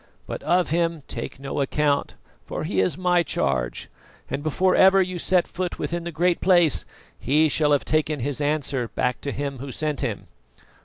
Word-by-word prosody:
But - - -6
of 175 -3 +1
him 165 -2 0
take - - -6
no 140 +1 -3
account, 145 +1 0 0.3
for - - -4
he 95 - -1
is 95 - 0
my 180 -1 +3
charge, 65 - -1 0.4
and 140 - -2
before 180 +5 +1
ever 190 +1 +6
you 185 -1 0
set 180 +1 +2
a - - -21
foot 180 -1 -3
within 170 0 -3
the 170 - -4
Great 175 +2 +1
Place 175 -5 +3 0.3
he 150 +5 +3
shall 150 0 +1
have 145 - +2
taken 155 -1 0
his 140 +3 -2
answer 145 -4 -1
back 125 0 -2
to 140 - -3
Him 140 -2 -4
Who 135 +1 -6
sent 150 0 -2
him." - - -3
155 Hz, 190 wpm, -24 LUFS, 140-175 Hz, 0.4 s, ever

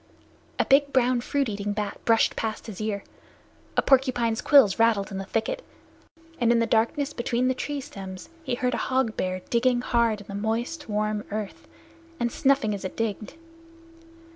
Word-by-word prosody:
A - - +2
big 280 +1 +4
brown 250 -2 +2
fruit 280 +2 0
eating 205 -1 -3
bat 210 -1 -4
brushed 225 -1 +3
past 220 -1 -3
his 215 -2 -7
ear; 210 -2 -2 0.7
a - - +4
porcupine's 250 -4 +2
quills 250 -9 +5
rattled 220 -3 +3
in 195 - -4
the 195 - -5
thicket; 365 - -2 0.8
and 235 -1 +3
in 235 - +4
the 230 - +2
darkness 235 +6 +1
between 240 0 0
the 260 - +2
tree 285 +3 -4
stems 190 -9 -8
he 260 -6 -2
heard 250 +1 -1
a - - 0
hog 260 -4 0
bear 185 0 -2
digging 245 +1 +2
hard 235 -4 +1
in - - -13
the 200 - -9
moist 230 +8 -3
warm 210 0 -1
earth, 210 -1 -5 0.5
and 235 0 0
snuffing 270 -6 +2
as 200 - -5
it 185 - -6
digged. 215 -1 -3
230 Hz, 175 wpm, -26 LUFS, 210-255 Hz, 0.8 s, quills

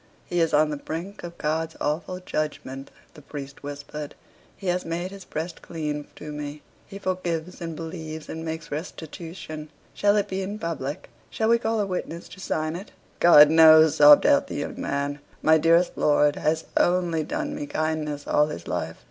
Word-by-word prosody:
"He 175 - -1
is 165 - +2
on 150 +1 +3
the 150 - -3
brink 170 +7 -6
of 170 0 -8
God's 160 +1 -1
awful 165 +5 -2
judgment," 150 -6 -4 0.2
the 150 - -13
priest 140 -1 -8
whispered. 145 +1 -7 0.4
"He 195 - -11
has 180 0 0
made 170 +3 -3
his 195 -1 -10
breast 165 +2 -5
clean 150 -3 -4
to 150 - -8
me. 150 0 -6 0.2
He 195 - -8
forgives 180 -2 -3
and 165 -1 -4
believes, 160 -1 -7
and 160 0 -6
makes 160 0 -5
restitution. 155 0 -7 0.2
Shall 205 0 +3
it 205 - +1
be 190 0 -3
in 200 +2 -4
public? 150 - -4 0.2
Shall 220 0 0
we 235 0 +5
call 225 -1 0
a 205 - +1
witness 180 -3 -4
to 185 - -12
sign 155 -3 -2
it?" 190 +4 -7 0.3
"God 150 -3 +8
knows," 160 -1 +7
sobbed 145 0 +8
out - - +4
the - - -6
young - - -4
man, 140 +1 -2 0.2
"my 160 0 +6
dearest 165 +3 +4
lord 145 0 +3
has 160 +1 0
only 175 -2 +2
done 300 - -3
me 290 0 -5
kindness 155 - -2
all 150 0 +3
his 85 - -7
life." - - -3
160 Hz, 180 wpm, -25 LUFS, 150-180 Hz, 0.4 s, God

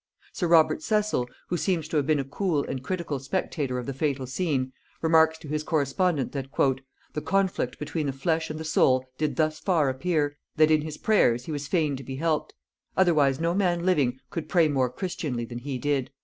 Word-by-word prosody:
Sir 180 - -1
Robert 165 - +4
Cecil, 210 - 0 0.2
who 175 - 0
seems 170 -4 0
to 160 - 0
have 145 -1 +1
been 155 -2 +3
a - - 0
cool 150 +2 -1
and 130 - -4
critical 160 -1 -3
spectator 140 -2 -2
of 125 - -4
the 140 - -3
fatal 135 -1 -1
scene, 130 -2 -1 0.3
remarks 160 0 +4
to 160 - -12
his 150 +1 -1
correspondent 155 0 0
that 135 -2 -4 0.7
"the 150 - -3
conflict 190 -10 0
between 150 0 -3
the - - 0
flesh 160 +4 -1
and 155 0 -5
the - - -4
soul 130 -4 +3
did 155 -1 0
thus 155 -1 +1
far 160 -5 +2
appear, 145 +1 0 0.2
that 155 0 +5
in 155 -1 +4
his 155 0 -6
prayers 125 - +3
he - - -5
was 145 -1 -4
fain 155 -4 +1
to 135 - -8
be 130 +1 -6
helped; 155 +1 -1 0.4
otherwise 150 -7 +4
no 165 +1 +1
man 175 -3 +1
living 140 -9 +2
could 155 -3 -5
pray 170 -3 +4
more 135 -4 +1
christianly 135 -6 -3
than 120 +1 -7
he 135 +1 -4
did." 140 -1 0
155 Hz, 205 wpm, -26 LUFS, 135-165 Hz, 0.7 s, that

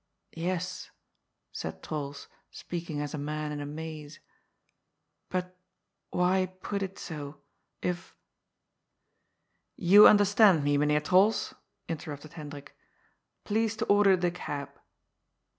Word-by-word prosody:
" - - -51 0.2
Yes," 185 +1 -4 0.6
said 80 0 -6
Trols, 145 -2 -5 0.2
speaking 165 -4 -6
as 145 +1 -4
a 150 - -3
man 150 +1 -3
in 145 -1 -4
a 145 - -5
maze. 155 0 -7 0.6
" - - -53
But 180 0 -3 0.5
why 185 +1 +2 0.2
put 200 -1 -2
it 195 0 -4
so? 145 -3 -7 0.4
If 180 -1 -3 0.8
" 175 -1 -10
"You 205 +1 +11
understand 205 -5 +5
me. 145 0 +2
Mynheer 150 +1 +2
Trols," 190 +7 +3 0.3
interrupted 155 -1 -6
Hendrik. 145 -3 -9 0.4
" - - -49
Please 220 +1 0
to 225 - -1
order 205 -2 +5
the 175 -1 0
cab." 145 -5 -5
165 Hz, 125 wpm, -29 LUFS, 145-185 Hz, 0.8 s, You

